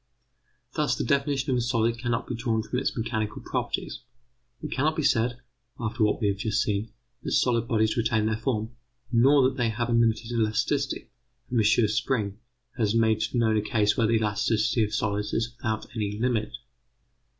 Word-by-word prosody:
Thus - - +1
the - - -2
definition 140 +1 0
of 125 - +2
a - - +1
solid 115 -1 0
cannot 120 0 -1
be - - -5
drawn 115 -2 -1
from 125 +3 -2
its 135 - -2
mechanical 110 -2 -2
properties. - - -3 0.6
It 155 - -5
cannot 155 +4 +1
be 155 - -1
said, 120 0 +1 0.4
after 115 0 -1
what 105 - +2
we 105 - +1
have 100 - -1
just 105 +1 0
seen, 105 +2 -2 0.3
that - - -3
solid 115 -2 +2
bodies 110 -1 +1
retain 110 -2 +1
their 110 0 +1
form, 110 -1 -2 0.4
nor 135 +4 +5
that 130 +1 -4
they 120 -3 +1
have 120 +2 -2
a - - +1
limited 115 0 +2
elasticity, 120 +5 -1 0.4
for 125 - -3
M. 110 +1 +4
Spring 110 -1 -1 0.4
has 110 -1 +1
made 110 -1 +3
known 110 -2 +3
a - - +2
case 105 -1 +1
where 115 - +2
the 115 - +2
elasticity 110 +1 +1
of 105 - -2
solids 105 -1 -1
is 115 +1 -1
without 110 -2 -3
any 105 -2 -2
limit. 115 -2 0
115 Hz, 185 wpm, -26 LUFS, 110-120 Hz, 0.6 s, nor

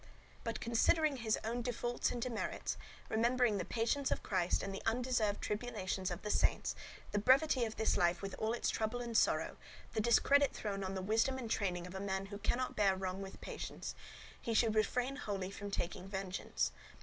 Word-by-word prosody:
But, 230 -1 -2
considering 280 +6 +3
his 225 -3 +1
own 235 +2 -1
defaults 240 0 -1
and 245 - -3
demerits, 235 -1 -2 0.2
— - - -20
remembering 235 -1 +3
the - - 0
patience 255 +4 0
of - - -1
Christ 180 -2 +1
and 195 - -3
the 195 - -5
undeserved 225 -3 +1
tribulations 210 -4 -2
of 175 0 -5
the 210 - -1
saints, - - +2 0.4
the 205 - +1
brevity 260 +2 +5
of 220 - -5
this 220 - +2
life 175 +2 +2
with 195 - -4
all 220 +1 +1
its 240 - 0
trouble 220 +2 -1
and 235 -1 -4
sorrow, - - +3 0.4
the 220 - +1
discredit 275 +5 +5
thrown 200 -2 -3
on 190 0 -3
the 190 - -3
wisdom 225 +6 +2
and 235 -4 -5
training 180 -4 0
of 180 - -8
a 190 - -4
man 190 -1 -2
who 200 +1 -7
cannot 250 +4 0
bear 200 -2 +4
wrong 190 0 -3
with 195 0 -8
patience - - -5 0.2
— - - -16
he 230 - -1
should 225 -1 +4
refrain 250 +5 +1
wholly 195 -7 -3
from 205 +1 -6
taking 185 -1 -3
vengeance. 195 -1 -2
220 Hz, 195 wpm, -36 LUFS, 195-240 Hz, 0.4 s, brevity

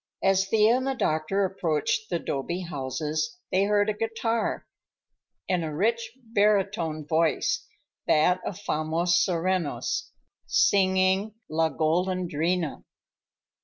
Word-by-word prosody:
As 195 0 +3
Thea 220 +3 +4
and 260 +1 -2
the 270 - 0
doctor 160 +1 0
approached 185 +3 -1
the 175 - 0
'dobe 170 +4 -3
houses, 150 - -3
they 190 +2 +3
heard 205 0 +2
a 215 - +1
guitar, 225 +1 -2 0.8
and 180 -3 0
a 155 - -3
rich 225 - -1 0.2
barytone 195 -7 +1
voice—that 165 +1 0
of 185 - -5
Famos 165 -2 -1
Serreños—singing 185 +3 0 0.2
"La 160 +1 +2
Golandrina." 170 +1 -1
185 Hz, 100 wpm, -26 LUFS, 160-205 Hz, 0.8 s, Thea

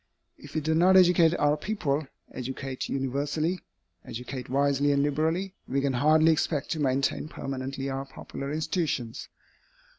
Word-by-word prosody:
If 145 +1 -13
we 155 - +1
do 160 +2 0
not 180 +4 +6
educate 175 -2 +5
our 145 0 +3
people, 155 -5 -2 0.2
educate 130 +1 -5
universally, 145 +6 -1 0.4
educate 125 +2 -6
wisely 140 +1 +2
and 140 0 +2
liberally, 160 +6 0
we 135 - 0
can 140 -1 0
hardly 155 +5 +5
expect 155 -2 0
to 160 - -1
maintain 140 +1 0
permanently 135 -1 -4
our 135 0 -3
popular 140 0 -7
institutions. 155 -7 -2
145 Hz, 140 wpm, -27 LUFS, 135-160 Hz, 0.4 s, not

